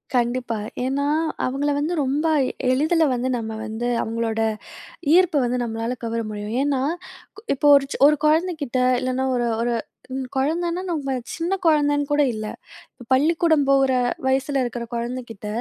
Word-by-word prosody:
கண்டிப்பா, 240 -1 0 0.3
ஏன்னா 280 +2 0 0.4
அவுங்கள 275 +3 0
வந்து 310 +4 -1
ரொம்ப 285 +4 0 0.4
எளிதில 315 +5 +2
வந்து 250 +1 -1
நம்ம 220 -1 -4
வந்து 220 +2 -3 0.2
அவுங்களோட 225 0 -2 0.8
ஈர்ப்பு 355 -4 +4
வந்து 250 +1 0
நம்மளால 230 +1 -3
கவர 230 0 -2
முடியும். 210 +1 -5
ஏன்னா 280 -2 0 0.6
கு - - -11
இப்போ 290 - +1
ஒரு 275 -1 +3
சொ - - -4
ஒரு 300 - +4
குழந்தைகிட்ட 310 -4 +1 0.2
இல்லைனா 255 +1 -1
ஒரு 240 -1 0 0.2
ஒரு 240 0 0 0.4
ம் 260 -1 -3
குழந்தன்னா, 335 +6 0
நம்ம 280 -6 -2 0.2
சின்ன 340 +3 -2
குழந்தன்னு 290 -3 +3
கூட 295 0 +3
இல்ல, 215 -1 -5 0.7
பள்ளிக்கூடம் 315 +2 +3
போற 270 -1 +4 0.3
வயசுல 270 +1 +1
இருக்கற 240 -1 -4
குழந்தகிட்ட 235 -3 -5
265 Hz, 140 wpm, -22 LUFS, 240-295 Hz, 0.8 s, ஈர்ப்பு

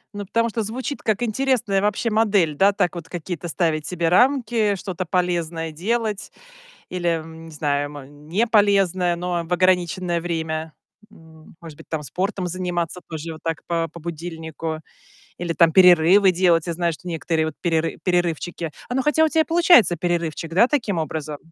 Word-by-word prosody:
Ну, 205 0 -5
потому 230 +3 +1
что 225 +1 -2
звучит 250 +6 -4
как 220 +1 0
интересная 235 -4 +1
вообще 210 +3 0
модель, 205 -8 +2
да. 195 +6 +4
Так 180 -3 0
вот 170 - -8
какие-то 175 -1 -5
ставить 160 -3 -1
себе 170 -2 -1
рамки, 230 -1 +3
что-то 185 -1 -5
полезное 170 -2 -1
делать 215 +5 -2 0.6
или, 180 -1 -3
м, 165 0 -4
не 165 - -11
знаю, 145 -1 -1
мо 145 -2 -10
неполезное, 185 - +1
но 175 0 -2
в 175 - -2
ограниченное 180 -1 +1
время. 160 -2 -3 0.4
М, 160 -4 -17
может 160 -3 -11
быть - - -14
там 155 -2 -4
спортом 185 - -3
заниматься 175 -1 -3
тоже 160 0 -6
вот 155 - -12
так 165 -1 -3
по 165 -1 0
по 165 +2 -12
будильнику 160 -1 -5 0.6
или 170 -1 -3
там 165 -1 +4
перерывы 180 +2 +6
делать. 175 -2 +2
Я 170 - -2
знаю, 170 0 0
что 180 +4 -11
некоторые 165 -1 -1
вот 160 - -4
переры 165 -2 0
перерывчики 175 -2 -1 0.2
Оно 255 +2 0
хотя 300 +2 +3
у 320 - +5
тя 320 +1 +2
и - - +3
получается 325 - +5
перерывчик, 170 -1 -2
да, 205 +7 +5
таким 235 - -1
образом? 155 -1 -4
175 Hz, 170 wpm, -22 LUFS, 160-200 Hz, 0.6 s, перерывы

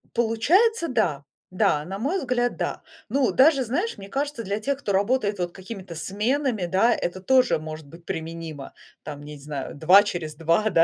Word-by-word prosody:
Получается, 335 - +3
да. 175 - 0 0.3
Да, 150 -4 +1
на 195 +2 -6
мой 300 +11 0
взгляд, 245 -4 -1
да. - - -3 0.3
Ну, 275 -2 +2
даже, 275 -1 +5
знаешь, 340 - -2
мне 195 0 -10
кажется, 280 -2 -3
для 200 +2 -2
тех, 280 +5 -2
кто 205 - -3
работает 205 +1 +1
вот 175 -1 -2
какими-то 190 -2 -9
сменами, 210 - -1
да, 195 +7 +3
это 185 +2 -4
тоже 255 -4 +3
может 155 -1 -8
быть 165 +3 -15
применимо. 160 -3 -6 0.3
Там 145 -2 -7
я 150 +1 -9
не - - -13
зна 140 -1 -5
2 180 +7 +6
через 170 -6 -4
2, 170 +7 +2
да,- 165 - +5
200 Hz, 185 wpm, -24 LUFS, 165-255 Hz, 0.3 s, 2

